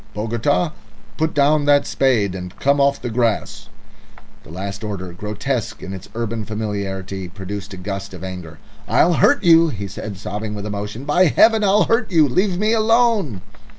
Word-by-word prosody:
"Bogota! 120 Hz, +9 st, 0 dB, 0.4 s
Put 160 Hz, 0 st, -1 dB
down 145 Hz, +1 st, +3 dB
that 145 Hz, 0 st, +4 dB
spade, 115 Hz, -8 st, +1 dB
and 90 Hz, -1 st, -7 dB
come 140 Hz, +1 st, +2 dB
off 140 Hz, 0 st, +2 dB
the 120 Hz, -, -3 dB
grass!" 115 Hz, -2 st, -1 dB, 0.7 s
The -, -, -17 dB
last 100 Hz, +5 st, -6 dB
order, 95 Hz, -4 st, -5 dB
grotesque 105 Hz, +3 st, -4 dB
in 95 Hz, -, -6 dB
its 95 Hz, -1 st, -9 dB
urban 115 Hz, -1 st, -3 dB
familiarity, 100 Hz, -3 st, -4 dB
produced 100 Hz, +1 st, -7 dB
a -, -, -11 dB
gust 100 Hz, +1 st, -5 dB
of 90 Hz, -, -10 dB
anger. 90 Hz, -4 st, -7 dB, 0.3 s
"I'll 175 Hz, -, +3 dB
hurt 285 Hz, -, +3 dB
you," 165 Hz, -1 st, +6 dB
he 100 Hz, -7 st, -5 dB
said, 100 Hz, +1 st, -7 dB
sobbing 105 Hz, +2 st, -5 dB
with 100 Hz, 0 st, -6 dB
emotion. 105 Hz, +4 st, -5 dB
"By 175 Hz, +6 st, +4 dB
Heaven, 220 Hz, +7 st, +4 dB
I'll 205 Hz, +1 st, +4 dB
hurt 230 Hz, 0 st, +1 dB
you. 160 Hz, -4 st, +5 dB
Leave 185 Hz, +7 st, 0 dB
me 215 Hz, +3 st, +1 dB
alone!" 220 Hz, -, +2 dB
110 Hz, 170 wpm, -20 LUFS, 100-155 Hz, 0.7 s, you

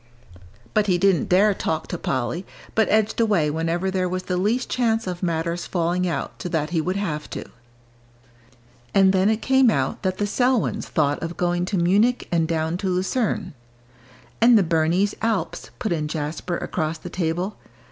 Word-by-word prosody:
But 210 Hz, -1 st, +2 dB
he 180 Hz, -2 st, +3 dB
didn't 195 Hz, -1 st, +2 dB
dare 200 Hz, +3 st, +5 dB
talk 160 Hz, -4 st, -2 dB
to 175 Hz, -, -3 dB
Polly, 130 Hz, +8 st, -2 dB, 0.3 s
but 220 Hz, -1 st, +2 dB
edged 215 Hz, +1 st, +2 dB
away 185 Hz, -10 st, +2 dB
whenever 165 Hz, +4 st, -1 dB
there 185 Hz, -1 st, 0 dB
was 185 Hz, +1 st, -3 dB
the 180 Hz, -, -2 dB
least 210 Hz, +8 st, 0 dB
chance 225 Hz, -2 st, 0 dB
of 180 Hz, -1 st, -4 dB
matters 170 Hz, 0 st, -2 dB
falling 180 Hz, +1 st, 0 dB
out 170 Hz, -, -4 dB
so 180 Hz, -, -4 dB
that 155 Hz, -2 st, -1 dB
he 165 Hz, -2 st, +1 dB
would 185 Hz, +4 st, -2 dB
have 160 Hz, -7 st, -3 dB
to. -, -, -6 dB, 1.5 s
And 195 Hz, -1 st, +5 dB
then 190 Hz, +2 st, +3 dB
it 220 Hz, 0 st, 0 dB
came 265 Hz, -2 st, +4 dB
out 135 Hz, -8 st, -1 dB
that 185 Hz, 0 st, -1 dB
the 205 Hz, -, 0 dB
Selwyns 245 Hz, +3 st, +1 dB
thought 145 Hz, -3 st, 0 dB
of 165 Hz, +1 st, -5 dB
going 175 Hz, 0 st, 0 dB
to 195 Hz, +1 st, -2 dB
Munich 205 Hz, +8 st, +2 dB
and 165 Hz, -2 st, +2 dB
down 160 Hz, +1 st, -1 dB
to 190 Hz, 0 st, -2 dB
Lucerne. 190 Hz, +1 st, -1 dB, 0.9 s
"And 235 Hz, 0 st, +7 dB
the 205 Hz, -, +4 dB
Bernese 170 Hz, +4 st, +1 dB
Alps," 225 Hz, -3 st, -2 dB
put 220 Hz, -6 st, -3 dB
in 155 Hz, -3 st, -1 dB
Jasper, 155 Hz, +3 st, -3 dB
across 160 Hz, -1 st, -2 dB
the -, -, -9 dB
table. 175 Hz, +3 st, -2 dB
180 Hz, 175 wpm, -23 LUFS, 165-205 Hz, 1.5 s, And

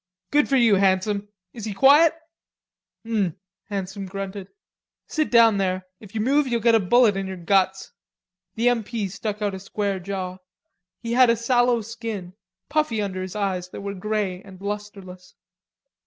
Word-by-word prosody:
"Good 295 Hz, 0 st, +3 dB
for 275 Hz, -, +3 dB
you, 230 Hz, -6 st, +5 dB
Handsome; 200 Hz, +2 st, +1 dB, 0.3 s
is 225 Hz, -3 st, -7 dB
he 210 Hz, -3 st, -4 dB
quiet?" 295 Hz, +8 st, +6 dB, 0.9 s
"Um." 205 Hz, -7 st, 0 dB, 0.3 s
Handsome 195 Hz, -1 st, -4 dB
grunted. 195 Hz, 0 st, -6 dB, 0.6 s
"Sit 310 Hz, -2 st, -1 dB
down 230 Hz, -4 st, +5 dB
there. 185 Hz, -1 st, -1 dB
If 210 Hz, 0 st, -14 dB
you 215 Hz, -, 0 dB
move 275 Hz, +5 st, +2 dB
you'll 240 Hz, -2 st, 0 dB
git 235 Hz, 0 st, +3 dB
a 225 Hz, -, +6 dB
bullet 220 Hz, +2 st, +4 dB
in 195 Hz, 0 st, -3 dB
your 190 Hz, 0 st, -6 dB
guts." 190 Hz, +2 st, +1 dB, 0.6 s
The 230 Hz, +2 st, +1 dB
M. 240 Hz, -2 st, 0 dB
P. 215 Hz, -1 st, -3 dB
stuck 210 Hz, +2 st, -4 dB
out 205 Hz, -1 st, 0 dB
a 190 Hz, -, -5 dB
square 200 Hz, 0 st, -2 dB
jaw; 185 Hz, 0 st, -5 dB, 0.6 s
he 230 Hz, 0 st, -2 dB
had 250 Hz, 0 st, +6 dB
a 230 Hz, -, +4 dB
sallow 240 Hz, 0 st, +2 dB
skin, 220 Hz, -5 st, -6 dB, 0.3 s
puffy 300 Hz, -7 st, 0 dB
under 185 Hz, -2 st, -3 dB
the 190 Hz, +3 st, -6 dB
eyes 185 Hz, -3 st, -2 dB
that -, -, -8 dB
were 200 Hz, 0 st, -4 dB
grey 200 Hz, -2 st, -2 dB
and 190 Hz, -2 st, -14 dB
lustreless. 200 Hz, -3 st, -7 dB
205 Hz, 170 wpm, -24 LUFS, 190-230 Hz, 0.9 s, quiet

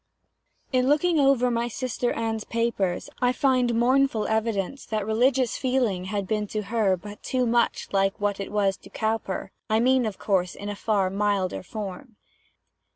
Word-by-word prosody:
In 255 Hz, 0 st, +2 dB
looking 315 Hz, +2 st, +3 dB
over 270 Hz, -3 st, +4 dB
my 235 Hz, 0 st, 0 dB
sister 245 Hz, 0 st, -2 dB
Anne's 225 Hz, -1 st, -2 dB
papers, 230 Hz, -7 st, -1 dB
I 245 Hz, 0 st, +4 dB
find 255 Hz, -3 st, +2 dB
mournful 250 Hz, -1 st, +2 dB
evidence 220 Hz, +2 st, -1 dB
that 215 Hz, -2 st, -2 dB
religious 245 Hz, +3 st, +2 dB
feeling 245 Hz, -8 st, 0 dB
had 200 Hz, 0 st, -3 dB
been 210 Hz, 0 st, -1 dB
to 215 Hz, +1 st, -3 dB
her 205 Hz, -3 st, +1 dB
but 205 Hz, +3 st, -10 dB
too 255 Hz, -1 st, 0 dB
much 235 Hz, 0 st, +1 dB
like 195 Hz, +1 st, +1 dB
what 205 Hz, -1 st, -1 dB
it 195 Hz, -, -5 dB
was 200 Hz, -2 st, +1 dB
to -, -, -16 dB
Cowper; 220 Hz, -3 st, -2 dB, 0.2 s
I 220 Hz, +1 st, +3 dB
mean, 255 Hz, 0 st, +3 dB
of 205 Hz, -, -5 dB
course, 185 Hz, -3 st, 0 dB
in 205 Hz, -, -6 dB
a 205 Hz, -, -3 dB
far 200 Hz, -3 st, 0 dB
milder 200 Hz, -2 st, 0 dB
form. 210 Hz, +4 st, -7 dB
220 Hz, 165 wpm, -25 LUFS, 200-250 Hz, 0.2 s, over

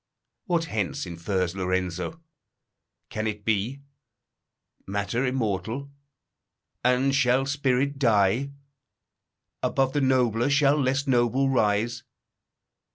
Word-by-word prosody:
What 170 Hz, -5 st, 0 dB
hence 100 Hz, -, -2 dB
infers 90 Hz, +1 st, -2 dB
Lorenzo? 95 Hz, -, -2 dB, 0.9 s
Can 110 Hz, 0 st, -3 dB
it 105 Hz, -1 st, -5 dB
be? 115 Hz, +6 st, -1 dB, 1.0 s
Matter 100 Hz, +6 st, -1 dB
immortal? 120 Hz, +2 st, -2 dB, 0.9 s
And 125 Hz, +2 st, +3 dB
shall 130 Hz, 0 st, +3 dB
spirit 140 Hz, 0 st, 0 dB
die? 115 Hz, +1 st, +3 dB, 1.1 s
Above 135 Hz, -1 st, +1 dB
the 145 Hz, -, +1 dB
nobler, 125 Hz, -2 st, +2 dB
shall 145 Hz, +1 st, +3 dB
less 135 Hz, +2 st, 0 dB
noble 130 Hz, +1 st, +2 dB
rise? 120 Hz, 0 st, +1 dB
125 Hz, 95 wpm, -26 LUFS, 105-135 Hz, 1.1 s, And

